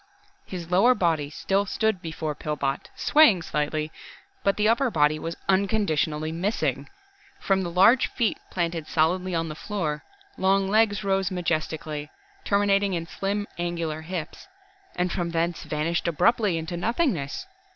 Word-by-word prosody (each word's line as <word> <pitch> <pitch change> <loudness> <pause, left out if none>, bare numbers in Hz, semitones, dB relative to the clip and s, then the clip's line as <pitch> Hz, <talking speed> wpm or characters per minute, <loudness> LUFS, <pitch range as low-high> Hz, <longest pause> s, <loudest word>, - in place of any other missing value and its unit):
His 175 -2 -7
lower 225 +8 +5
body 160 -7 +1
still 195 +6 0
stood 220 -2 0
before 160 -2 -4
Pillbot, 140 -2 -3
swaying 230 - +5
slightly, 155 0 -2 0.5
but 200 - +2
the 210 0 +3
upper 245 +4 +3
body 155 -4 +2
was 165 +1 -4
unconditionally 175 -6 +1
missing. 185 +7 -1 0.5
From 195 -1 +1
the 175 - -3
large 195 +9 +5
feet 235 -4 -1
planted 170 -3 -2
solidly 175 +4 +1
on 165 0 0
the 155 - -5
floor, 160 -4 -3 0.4
long 195 +1 +3
legs 210 0 +2
rose 195 -1 +1
majestically, 155 -4 -2 0.3
terminating 200 -1 +2
in 165 -1 -3
slim, 200 +4 -2
angular 170 -3 -2
hips 170 - -6 0.5
and 180 0 0
from 175 -1 -1
thence 170 0 -1
vanished 160 +3 -1
abruptly 200 +3 +2
into 165 +2 -4
nothingness. 225 - -1
175 Hz, 140 wpm, -25 LUFS, 160-200 Hz, 0.5 s, lower